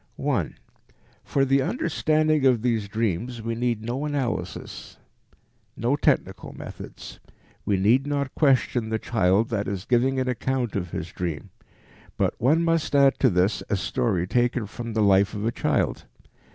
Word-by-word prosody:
1. 130 - -1 0.7
For 135 -1 +1
the 135 +1 +3
understanding 155 - +1
of 125 -4 +3
these 115 -4 0
dreams 115 +2 -2
we 115 +1 -2
need 115 -1 -1
no 120 +5 -3
analysis, 140 -5 -4 0.8
no 120 +5 +1
technical 145 - 0
methods. - - -10 0.5
We 100 - +1
need 120 +9 +3
not 140 -2 -2
question 130 -5 +2
the 110 - 0
child 110 -1 +1
that 105 -3 -2
is 100 -1 -4
giving 130 +2 +2
an 130 - -1
account 125 -1 -1
of 90 -3 -2
his 85 +1 -5
dream. 85 -4 -5 0.7
But - - +1
one 155 +8 +3
must 165 -3 +1
add 140 -1 +4
to 130 - +4
this 95 +2 +1
a - - +1
story 95 -1 0
taken 120 +3 +1
from 115 +3 -7
the 110 -1 +2
life 100 +1 +3
of 105 - -4
the 115 - +1
child. - - -1
120 Hz, 155 wpm, -25 LUFS, 105-135 Hz, 0.8 s, add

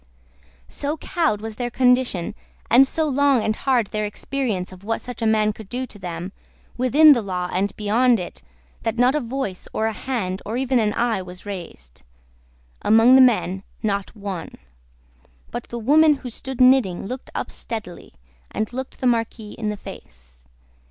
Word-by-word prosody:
So 290 +2 -3
cowed 315 -11 0
was 220 -1 -7
their 245 -1 -2
condition, 250 -6 +2 0.4
and 260 +4 +7
so 315 +3 0
long 280 -4 +3
and 215 - 0
hard 250 -3 +1
their 215 -1 -1
experience 210 -3 -3
of 185 0 -13
what 225 +2 -1
such 245 -2 -9
a 225 - +2
man 215 -1 +2
could 210 -2 -12
do 255 +1 -3
to 210 - -11
them, 175 0 -5 0.4
within 285 +5 +6
the 250 -5 +4
law 180 -3 -3
and 195 +3 0
beyond 230 +3 +3
it, 175 - -7 0.4
that 225 0 -2
not 250 +2 +4
a 300 - +1
voice, 240 -7 -4
or 220 - 0
a 220 - 0
hand, 205 -6 -3
or 220 +4 -3
even 260 -1 +1
an 210 -2 +1
eye 230 -4 +1
was 180 +1 -10
raised. 170 - -8 0.8
Among 225 +3 +6
the 265 - +8
men, 210 -7 +3 0.2
not 200 -1 -2
one. 200 -4 -6 1.0
But 240 - -5
the 235 - -6
woman 300 +6 +5
who 255 -3 -8
stood 265 +2 -7
knitting 255 -9 +4
looked 255 +5 -6
up - - -3
steadily, 200 - -7 0.3
and 215 +2 -3
looked 260 +1 -6
the - - -1
Marquis 230 -3 0
in 215 -2 -4
the 210 - -3
face. - - -13
225 Hz, 175 wpm, -22 LUFS, 200-255 Hz, 1.0 s, the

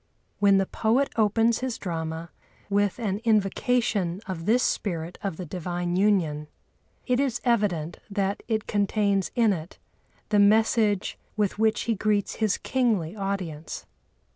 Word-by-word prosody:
When 200 -1 +5
the 195 - +2
poet 235 +8 +1
opens 225 +1 +3
his 255 -2 -3
drama 165 -2 -4 0.4
with 205 -1 +2
an 205 -4 -2
invocation 210 -3 +1
of 180 -3 -5
this 245 +3 +4
Spirit 170 -3 -2
of 195 -5 -3
the 180 - -5
Divine 175 +1 -3
Union 175 -7 +1 0.6
it 250 -1 +1
is 260 -4 0
evident 200 -9 0
that 200 -1 -1
it 220 -2 -1
contains 200 -2 +1
in 230 -4 +4
it 165 0 -7 0.5
the 210 - +3
message 210 -1 +3 0.2
with 205 -1 0
which 220 0 +2
he 230 - 0
greets 210 -1 0
his 215 -3 +1
kingly 220 -10 0
audience. 190 -6 -4
200 Hz, 140 wpm, -26 LUFS, 180-220 Hz, 0.6 s, When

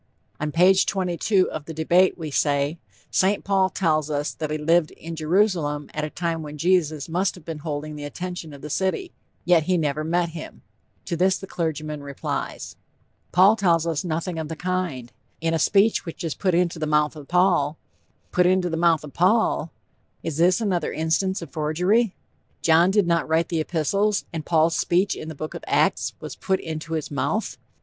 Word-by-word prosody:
On 150 0 -2
page 185 +4 +4
22 185 +1 +1
of 150 - -6
The 160 - -7
Debate, 175 +4 +3
we 160 -3 -5
say: 145 +3 +1 0.3
"St. 195 +2 +2
Paul 195 -1 +2
tells 155 -6 0
us 145 0 -2
that 155 -2 -4
he 155 - -1
lived 160 +1 +2
in 165 0 -8
Jerusalem 160 -3 0
at 155 - -3
a 155 - -2
time 165 0 -2
when 150 -1 -8
Jesus 160 -3 +1
must 180 +3 0
have 175 -4 -15
been 160 -2 -5
holding 150 0 -5
the 145 - -7
attention 175 +2 -6
of 140 -1 -12
the 150 - -6
city; 195 - -1 0.3
yet 175 -3 +4
he 185 +1 +2
never 155 -1 -1
met 170 +2 0
him." 160 -1 -9 0.4
To - - -2
this 185 +3 +2
the - - -8
clergyman 155 -4 -3
replies: 140 -1 -5 0.6
"Paul 190 +4 +6
tells 170 -6 +2
us 165 -3 -1
nothing 165 0 -3
of 160 - -4
the 160 - -5
kind. 175 -9 -3 0.3
In 165 0 0
a 165 - +1
speech 205 +7 +3
which 165 -1 -7
is 165 -3 -2
put 185 -3 0
into 170 -2 +1
the 155 - -1
mouth 150 0 +2
of 145 -2 -10
Paul" 175 -4 +2 0.5
put 180 0 +3
into 185 -1 +2
the 165 - -1
mouth 165 -2 +3
of 150 - -10
Paul! 185 -3 +2 0.5
Is 160 -3 -3
this 175 +4 +4
another 185 -7 -1
instance 170 +4 0
of 155 - -11
forgery? 180 +8 +1 0.5
John 165 +2 +5
did 200 0 +3
not 170 -2 +1
write 165 +1 +2
the 165 -3 0
epistles, 195 +6 0
and 160 -2 -5
Paul's 165 0 +3
speech 180 +4 +1
in 155 - -7
the 160 - -7
Book 155 +2 -6
of - - -8
Acts - - +1
was - - -7
put 190 0 -1
into 160 0 -5
his 155 -2 -3
mouth! 205 +9 -2
165 Hz, 195 wpm, -24 LUFS, 155-185 Hz, 0.6 s, Paul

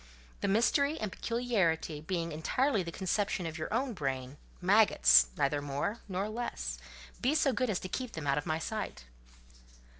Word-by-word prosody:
"The - - -1
mystery 280 +9 +2
and 215 -3 -3
peculiarity 190 -12 0
being 165 0 -2
entirely 220 - +1
the 170 -2 -5
conception 190 0 -1
of 160 -1 -4
your 155 -1 -4
own 245 +3 0
brain—maggots—neither 140 - +3
more 145 +11 -2
nor 195 +1 -2
less, 215 - -4 0.4
be 270 +5 +2
so 285 -4 +3
good 255 -1 0
as 195 - 0
to - - -4
keep 250 +5 -4
them 160 -3 -5
out 140 0 +2
of 145 - -7
my 155 - +1
sight." 195 - -4
185 Hz, 155 wpm, -31 LUFS, 150-230 Hz, 0.4 s, brain—maggots—neither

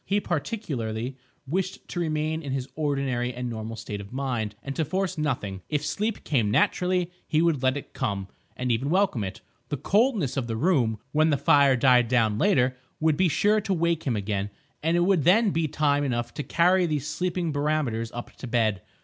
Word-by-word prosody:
He 200 +1 +1
particularly 135 - -3 0.3
wished 185 +6 -3
to 175 - -3
remain 155 -1 -1
in 140 -4 -4
his 135 -1 -2
ordinary 135 -5 -1
and 125 0 -3
normal 110 0 -5
state 105 -2 -6
of 100 - -12
mind, 120 -6 -2
and 135 0 -5
to 160 - +1
force 185 +5 -1
nothing. 120 -11 -2
If 150 -1 -1
sleep 210 +8 -2
came 120 -8 +1
naturally, 180 - +1 0.2
he 155 - +2
would 165 -5 +2
let 130 +1 +2
it 145 - -9
come—and 110 +2 -4
even 125 +5 0
welcome 185 - +2
it. 95 - -6 0.3
The 145 - -2
coldness 200 - +1
of 130 -3 -1
the 115 - -2
room, 125 -7 +2
when 155 +2 +3
the 145 - +2
fire 140 -2 +5
died 125 -1 +4
down 110 -3 +2
later, 130 -11 +3 0.2
would 155 -1 +3
be 185 +4 +3
sure 210 +7 +2
to 195 - -1
wake 170 -2 0
him 125 - +1
again; 100 -1 -2 0.3
and 165 +2 +2
it - - +3
would 180 -3 +3
then 205 - +5
be 165 -2 0
time 145 -1 +1
enough 120 -3 -2
to - - -4
carry 175 +4 +3
these 150 -4 -1
sleeping 180 -2 -2
barometers 145 -6 -1
up 120 - -8
to 130 - -7
bed. 110 -5 +1
145 Hz, 195 wpm, -26 LUFS, 120-170 Hz, 0.3 s, fire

